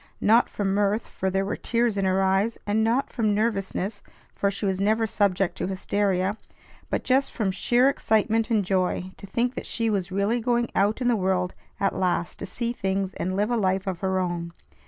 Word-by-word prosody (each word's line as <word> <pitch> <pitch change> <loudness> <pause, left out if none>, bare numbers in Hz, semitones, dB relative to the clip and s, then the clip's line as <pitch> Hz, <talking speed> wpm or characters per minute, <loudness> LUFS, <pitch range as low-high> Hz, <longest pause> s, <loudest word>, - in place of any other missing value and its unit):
Not 230 +3 +4
from 195 -2 -1
mirth, 205 +2 +1
for 190 - -3
there 195 +1 0
were 200 - -2
tears 235 -2 0
in 195 -1 0
her 190 +1 +2
eyes; 195 +4 +1
and 210 +2 +1
not 235 +5 +1
from 215 -4 +1
nervousness, 205 -2 -1 0.3
for 200 - 0
she 200 +1 -3
was 190 -1 0
never 220 +3 +2
subject 195 -4 +1
to - - -1
hysteria; 195 0 0 0.5
but - - -1
just 270 +2 +2
from 210 -5 -1
sheer 240 +6 +3
excitement 225 -4 +1
and 215 -4 +2
joy 185 0 0
to 200 - -10
think 240 +5 0
that - - -6
she 230 -2 0
was 195 -2 -1
really 200 +5 +1
going 240 0 0
out 205 +5 +1
in 245 - +1
the 240 - +4
world 185 -2 0 0.3
at 195 - +1
last 175 -2 -1
to - - -5
see 235 +5 -2
things 195 -3 -2
and 185 +1 -3
live 205 +4 0
a - - +2
life 190 -2 +1
of 185 -3 -3
her 190 +1 0
own. 175 -2 -2
200 Hz, 205 wpm, -25 LUFS, 190-225 Hz, 0.5 s, Not